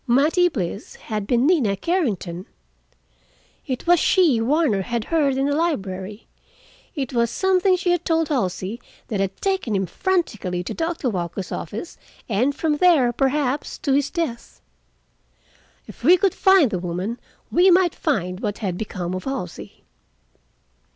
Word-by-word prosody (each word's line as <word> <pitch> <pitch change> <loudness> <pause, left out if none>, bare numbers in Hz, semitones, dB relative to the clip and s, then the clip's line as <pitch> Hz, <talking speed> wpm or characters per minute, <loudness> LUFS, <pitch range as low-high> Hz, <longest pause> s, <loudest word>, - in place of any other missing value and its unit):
Mattie 305 +8 +3
Bliss 200 - -5
had 210 -3 -5
been 245 +1 +2
Nina 270 - +2
Carrington. 200 - -2 1.2
It 255 -2 -3
was 350 0 +5
she 315 -13 +3
Warner 260 -4 +2
had 235 +3 -2
heard 285 -2 +1
in 270 - +1
the 285 0 +1
library. 205 - -3 0.7
It 270 -4 -3
was 235 -1 +2
something 380 - +2
she 355 0 0
had 350 -1 0
told 325 -2 +1
Halsey 205 - -2 0.3
that 205 - -2
had 195 0 -2
taken 385 - 0
him 190 0 0
frantically 190 - -1
to - - -5
Doctor 330 -4 -2
Walker's 180 -3 -3
office, 215 - -6 0.3
and 250 +6 +1
from 300 0 0
there 295 -9 +4
perhaps 270 +1 -1
to 275 - -1
his 285 +1 +2
death. 315 -10 -4 1.3
If - - -14
we 360 - +7
could 385 -1 +2
find 380 - +4
the 185 - -1
woman, 180 +7 -4 0.3
we 360 +2 +5
might 360 -2 +4
find 185 - -2
what 205 -2 -3
had 185 -5 -3
become 185 -4 -4
of 185 - -5
Halsey. 265 -11 -6
255 Hz, 150 wpm, -22 LUFS, 200-330 Hz, 1.3 s, we